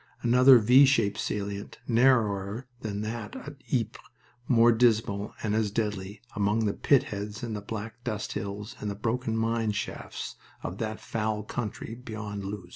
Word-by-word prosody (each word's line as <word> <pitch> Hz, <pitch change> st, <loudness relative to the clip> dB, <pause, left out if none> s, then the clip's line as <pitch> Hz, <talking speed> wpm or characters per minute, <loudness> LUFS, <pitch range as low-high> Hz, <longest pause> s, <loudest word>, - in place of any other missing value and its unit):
Another 125 Hz, +2 st, +8 dB
V 125 Hz, +5 st, +7 dB
shaped 115 Hz, -7 st, +2 dB
salient, 100 Hz, -2 st, -3 dB
narrower 115 Hz, -3 st, +2 dB
than 105 Hz, -4 st, -4 dB
that 110 Hz, 0 st, -5 dB
of 145 Hz, 0 st, -8 dB
Ypres, 120 Hz, -5 st, -1 dB, 0.5 s
more 120 Hz, -1 st, +6 dB
dismal, 110 Hz, -3 st, +2 dB
and 105 Hz, -2 st, 0 dB
as 110 Hz, -1 st, +1 dB
deadly, 105 Hz, -2 st, -3 dB
among 105 Hz, +2 st, +1 dB
the 100 Hz, -, +1 dB
pit 140 Hz, -3 st, +4 dB
heads 105 Hz, +2 st, -6 dB
and 115 Hz, -2 st, -3 dB
the 105 Hz, -, -4 dB
black 110 Hz, +3 st, -6 dB
dust 105 Hz, -3 st, -3 dB
hills 100 Hz, +1 st, -5 dB
and 105 Hz, -, -3 dB
the 100 Hz, -, -3 dB
broken 115 Hz, +2 st, -1 dB
mine 115 Hz, -1 st, +1 dB
shafts 105 Hz, -, -5 dB, 0.3 s
of 90 Hz, -, -5 dB
that 110 Hz, -1 st, -3 dB
foul 105 Hz, -1 st, -2 dB
country 110 Hz, 0 st, -5 dB
beyond 110 Hz, -4 st, -6 dB
Loos. 95 Hz, -2 st, -6 dB
110 Hz, 160 wpm, -28 LUFS, 105-115 Hz, 0.5 s, Another